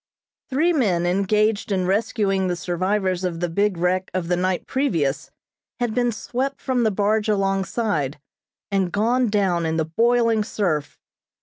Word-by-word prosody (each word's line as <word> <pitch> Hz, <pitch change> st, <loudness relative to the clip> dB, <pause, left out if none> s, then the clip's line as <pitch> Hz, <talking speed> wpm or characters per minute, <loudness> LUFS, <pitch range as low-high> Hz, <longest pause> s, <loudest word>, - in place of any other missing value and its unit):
Three 315 Hz, +6 st, +2 dB
men 190 Hz, -, +1 dB
engaged 205 Hz, +4 st, +1 dB
in 185 Hz, -2 st, +1 dB
rescuing 195 Hz, -1 st, +1 dB
the 180 Hz, -, 0 dB
survivors 185 Hz, +1 st, -1 dB
of 175 Hz, -2 st, -2 dB
the 175 Hz, -, 0 dB
big 200 Hz, +2 st, 0 dB
wreck 185 Hz, +2 st, 0 dB
of 175 Hz, -2 st, -2 dB
the 180 Hz, -, +3 dB
night 180 Hz, 0 st, -1 dB
previous, 165 Hz, -, -1 dB, 0.5 s
had 240 Hz, -3 st, -1 dB
been 245 Hz, 0 st, +1 dB
swept 260 Hz, +5 st, -3 dB
from 255 Hz, -2 st, 0 dB
the 225 Hz, -, +3 dB
barge 210 Hz, +2 st, +1 dB
alongside, 195 Hz, -, 0 dB, 0.5 s
and 190 Hz, -3 st, +1 dB
gone 235 Hz, +5 st, +1 dB
down 190 Hz, -5 st, +1 dB
in 160 Hz, 0 st, -1 dB
the 160 Hz, -, +1 dB
boiling 230 Hz, +5 st, +2 dB
surf. 175 Hz, -9 st, -2 dB
195 Hz, 150 wpm, -22 LUFS, 180-225 Hz, 0.5 s, the